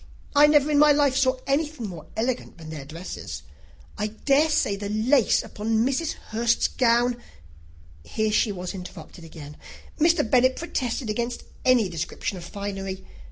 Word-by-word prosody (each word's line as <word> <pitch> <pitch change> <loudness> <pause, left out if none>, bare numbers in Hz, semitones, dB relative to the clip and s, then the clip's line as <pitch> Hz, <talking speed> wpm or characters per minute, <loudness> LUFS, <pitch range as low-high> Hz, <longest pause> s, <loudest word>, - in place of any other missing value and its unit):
I 295 +1 +8
never 295 0 +4
in 290 - +4
my 300 0 +7
life 285 -2 +3
saw 260 -1 +2
anything 290 -4 -1
more 165 -5 -9
elegant 240 -2 -2
than 160 -2 -10
their 145 -3 -7
dresses. 165 +5 -7 0.6
I 210 - 0
dare 275 +8 +2
say 205 -9 +1
the 200 0 -5
lace 225 +4 +3
upon 220 +2 -1
Mrs. 300 +5 0
Hurst's 235 +2 0
gown 240 0 +2 0.4
" 80 -1 -24
Here 220 -1 +1
she 210 0 +2
was 180 -1 -5
interrupted 180 -2 -10
again. 150 -2 -11 0.4
Mr. 330 -4 +3
Bennet 255 +2 +4
protested 250 -7 -3
against 235 +3 -3 0.2
any 250 -5 +4
description 175 +3 -4
of - - -10
finery. 195 0 -5
225 Hz, 160 wpm, -25 LUFS, 185-265 Hz, 0.6 s, I